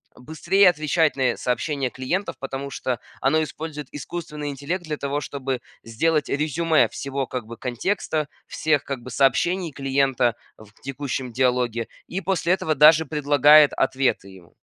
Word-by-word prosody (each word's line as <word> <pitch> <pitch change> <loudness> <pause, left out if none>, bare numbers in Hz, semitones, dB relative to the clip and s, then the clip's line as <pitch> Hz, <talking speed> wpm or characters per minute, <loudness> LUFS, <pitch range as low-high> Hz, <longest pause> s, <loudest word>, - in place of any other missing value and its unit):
быстрее 170 +8 +3
отвечать 155 -1 +1
на 130 -3 +1
сообщения 135 +1 -1
клиентов, 170 +12 -3
потому 135 +1 -5
что 125 -2 -3 0.2
оно 150 +4 +2
использует 150 -2 -6
искусственный 150 -1 -6
интеллект 145 +7 -4
для 155 -2 -4
того, 140 +1 -2
чтобы 135 -2 -4 0.2
сделать 150 +7 0
резюме 155 +2 +2
всего, 140 0 -4
как 125 -3 -6
бы 115 0 -9
контекста, 150 - -2 0.2
всех, 155 -3 0
как 135 -3 -5
бы 125 - -9
сообщений 160 +7 +1
клиента 135 -3 +1 0.2
в 105 -1 -15
текущем 135 -2 -4
диалоге, 125 -2 0 0.2
и 190 +2 -4
после 180 -1 +1
этого 160 -4 0
даже 155 +2 +6
предлагает 145 0 +5
ответы 130 -6 0
ему. 95 -3 -16
140 Hz, 145 wpm, -23 LUFS, 130-155 Hz, 0.2 s, даже